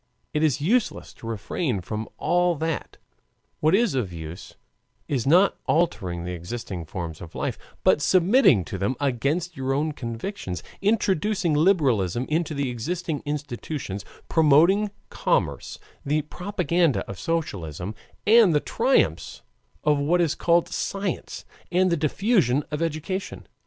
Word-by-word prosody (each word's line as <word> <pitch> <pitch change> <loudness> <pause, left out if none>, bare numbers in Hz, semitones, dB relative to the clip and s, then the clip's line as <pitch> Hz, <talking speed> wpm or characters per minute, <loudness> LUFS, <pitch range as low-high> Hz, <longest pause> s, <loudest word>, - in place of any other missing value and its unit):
It 150 - +1
is 155 -2 +2
useless 210 +10 0
to 115 - -11
refrain 115 - -2
from 110 +4 -5
all 175 0 +2
that; 160 0 -3 0.6
what 155 +4 +4
is 230 -4 +2
of 120 -9 -1
use 80 0 -8 0.5
is 135 -4 -1
not 180 +7 +4
altering 95 - 0
the 90 - -4
existing 90 0 -5
forms 80 -1 -6
of 85 -2 -10
life, - - -2 0.3
but - - +4
submitting 180 - +4
to 95 - -5
them 100 +7 0
against 145 +6 -1
your 135 -1 -1
own 155 +2 0
convictions, 115 - -5 0.2
introducing 195 -3 +1
liberalism 135 - +2
into 155 0 0
the 140 -2 -1
existing 160 +6 -3
institutions, 145 -7 -4 0.2
promoting 165 +7 +4 0.2
commerce, - - -1 0.3
the 150 +1 0
propaganda 175 - 0
of 95 - -7
socialism, 95 - -3 0.3
and 215 -6 +6
the - - +5
triumphs 250 - +1 0.4
of 150 -1 +3
what 160 +5 +2
is 165 -4 +2
called 170 0 +2
science, 195 -2 -3 0.3
and 185 0 +3
the - - +3
diffusion 155 - +2
of 150 +1 -3
education. 165 +4 -3
150 Hz, 135 wpm, -25 LUFS, 115-175 Hz, 0.6 s, and